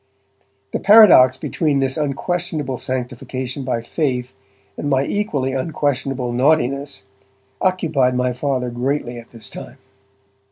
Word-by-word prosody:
The - - 0
paradox 200 - +7
between 150 -4 -1
this 135 -1 0
unquestionable 150 -1 -2
sanctification 130 +1 -4
by 120 -3 -2
faith 125 -2 -2 0.4
and 145 - -3
my 135 -1 +2
equally 145 -11 -1
unquestionable 135 -3 -2
naughtiness, 140 -2 +1 0.6
occupied 155 -9 +1
my 125 0 0
Father 125 -1 -2
greatly 120 0 -2
at 115 - -14
this 115 -3 -10
time. - - -9
135 Hz, 115 wpm, -20 LUFS, 125-150 Hz, 0.6 s, paradox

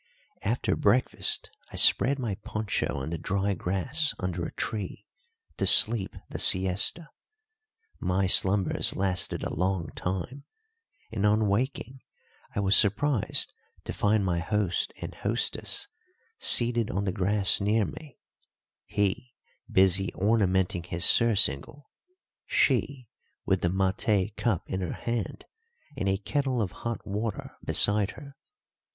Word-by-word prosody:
After 115 +5 -1
breakfast 110 +5 +1 0.2
I - - -9
spread 140 +2 +5
my 120 -6 -3
poncho 110 -10 -2
on 70 +4 -5
the 85 - -4
dry 100 +4 -1
grass 100 - 0
under 90 -2 -4
a - - -9
tree 105 -1 -5 0.5
to - - 0
sleep 110 -4 +4
the - - -7
siesta. 95 - +3 0.9
My 95 +1 0
slumbers 95 +1 +3
lasted 95 -1 +1
a - - -4
long 90 -1 -1
time, 95 +10 -5 0.7
and 105 -2 -3
on 105 +1 +3
waking 130 +4 -2 0.5
I 100 - 0
was 100 0 +3
surprised 110 +4 +2 0.3
to - - -6
find 105 -1 +1
my 85 -2 0
host 95 0 -1
and - - -7
hostess 115 - -2 0.5
seated 120 -1 +2
on 100 -5 -2
the 95 - -1
grass 100 +2 +1
near 105 +1 +2
me, 150 +4 -10 0.7
he 120 +5 -2 0.4
busy 95 0 +3
ornamenting 95 -4 +1
his 85 0 -3
surcingle, 115 - +3 0.6
she 130 -4 0 0.4
with 95 -1 +1
the 85 - +1
maté 95 +2 0
cup 110 -8 -1
in 95 - -3
her 90 - -3
hand 115 -3 -4 0.5
and 100 -7 -2
a 95 - +1
kettle 130 +4 -2
of 100 -5 -1
hot 115 -1 -6
water 105 +1 -4
beside 105 0 +3
her. 140 0 -12
100 Hz, 130 wpm, -27 LUFS, 95-115 Hz, 0.9 s, spread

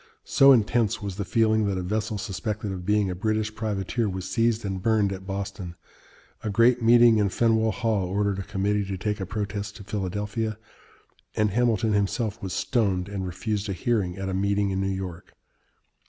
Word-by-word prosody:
So 140 0 +6
intense 115 -3 +3
was 100 -2 -4
the 100 - -1
feeling 110 0 +2
that 100 -2 -1
a 90 - -2
vessel 105 +3 -2
suspected 105 0 -4
of 90 -1 -6
being 105 -2 +2
a - - -4
British 110 +2 -1
privateer 110 +1 -2
was 95 -1 -5
seized 115 -1 +1
and 95 -2 -3
burned 105 -2 +2
at 95 0 -9
Boston, 95 -3 -5 0.7
a 110 - -2
great 115 +4 +4
meeting 115 -1 +6
in 100 -1 +2
Faneuil 110 +2 +2
Hall 110 -5 0
ordered 100 +1 0
a - - -3
committee 100 +2 0
to 95 -1 -4
take 105 +4 -2
a 95 - -4
protest 100 0 -4
to 105 - -10
Philadelphia, 105 +3 -3 0.8
and 105 -1 +2
Hamilton 115 -1 +2
himself 105 +2 -1
was 95 - -4
stoned 100 -7 0
and 95 -2 -4
refused 105 +3 -3
a - - -1
hearing 95 -3 -1
at 95 0 -4
a 95 - -2
meeting 100 +1 +1
in 95 0 -1
New 95 - 0
York. 95 -3 -5
105 Hz, 185 wpm, -26 LUFS, 95-110 Hz, 0.8 s, So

